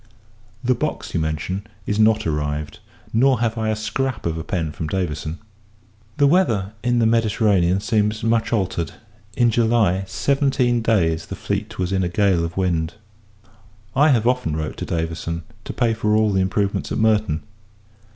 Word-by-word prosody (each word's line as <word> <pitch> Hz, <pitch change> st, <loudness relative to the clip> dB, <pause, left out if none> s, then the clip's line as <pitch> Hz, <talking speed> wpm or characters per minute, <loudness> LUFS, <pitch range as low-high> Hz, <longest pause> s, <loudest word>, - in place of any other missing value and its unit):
The 125 Hz, +1 st, +3 dB
box 150 Hz, +5 st, -3 dB
you 85 Hz, -, +1 dB
mention, 80 Hz, +6 st, -3 dB, 0.2 s
is 105 Hz, +1 st, -1 dB
not 110 Hz, 0 st, +4 dB
arrived; 75 Hz, -1 st, -2 dB, 0.3 s
nor 130 Hz, +2 st, +4 dB
have 115 Hz, -1 st, 0 dB
I 110 Hz, -1 st, -1 dB
a 110 Hz, -, +1 dB
scrap 115 Hz, +2 st, -2 dB
of 80 Hz, -1 st, 0 dB
a 80 Hz, -, -4 dB
pen 80 Hz, -4 st, -2 dB
from 80 Hz, +1 st, -5 dB
Davison. 80 Hz, -2 st, -3 dB, 0.8 s
The 145 Hz, -, +4 dB
weather 115 Hz, -, +2 dB
in 120 Hz, -1 st, +2 dB
the 115 Hz, -, +3 dB
Mediterranean 105 Hz, -5 st, +2 dB
seems 110 Hz, -1 st, 0 dB
much 115 Hz, 0 st, +1 dB
altered. 95 Hz, -7 st, -1 dB, 0.4 s
In 120 Hz, -1 st, +4 dB
July, 110 Hz, -5 st, +2 dB
seventeen 135 Hz, -2 st, +1 dB
days 85 Hz, -8 st, +1 dB
the -, -, -5 dB
fleet -, -, -4 dB
was 90 Hz, 0 st, -1 dB
in 95 Hz, -1 st, +1 dB
a 90 Hz, -, 0 dB
gale 95 Hz, -2 st, +2 dB
of 85 Hz, +1 st, -5 dB
wind. 85 Hz, -3 st, 0 dB, 1.0 s
I 145 Hz, +3 st, +5 dB
have 120 Hz, -6 st, +3 dB
often 125 Hz, -11 st, +1 dB
wrote 80 Hz, -1 st, -4 dB
to -, -, -4 dB
Davison, 85 Hz, 0 st, -3 dB, 0.2 s
to -, -, -4 dB
pay 120 Hz, -2 st, +1 dB
for 105 Hz, -1 st, +1 dB
all 110 Hz, -1 st, +3 dB
the 95 Hz, -, +2 dB
improvements 100 Hz, +1 st, -1 dB
at -, -, -1 dB
Merton. 110 Hz, -7 st, +2 dB
105 Hz, 170 wpm, -21 LUFS, 85-115 Hz, 1.0 s, I